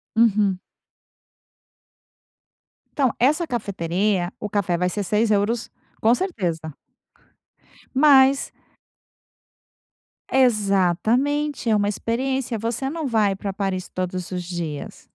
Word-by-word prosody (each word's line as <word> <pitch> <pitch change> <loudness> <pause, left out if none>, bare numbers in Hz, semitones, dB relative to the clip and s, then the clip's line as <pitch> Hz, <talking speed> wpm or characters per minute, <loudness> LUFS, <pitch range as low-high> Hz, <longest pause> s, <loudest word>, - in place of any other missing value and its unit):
Uhum. 210 -4 +3 2.3
Então, 265 -5 +1
essa 305 +7 +3
cafeteria 195 -3 -1
o 210 - -4
café 190 -4 0
vai 180 +1 0
ser 205 +2 -3
6€ 215 +3 +1 0.3
com 225 +2 +5
certeza... 170 - -3 1.2
mas 275 -1 +5 1.8
Exatamente, 240 - +2
é 220 - +4
uma 205 -1 +1
experiência, 245 +3 -2
você 230 +5 -2
não 315 -1 -3
vai 210 -5 +2
pra 195 0 -5
Paris 190 -2 -3
todos 185 -1 -4
os 180 -1 -3
dias. 170 -4 -6
210 Hz, 95 wpm, -23 LUFS, 185-255 Hz, 2.3 s, com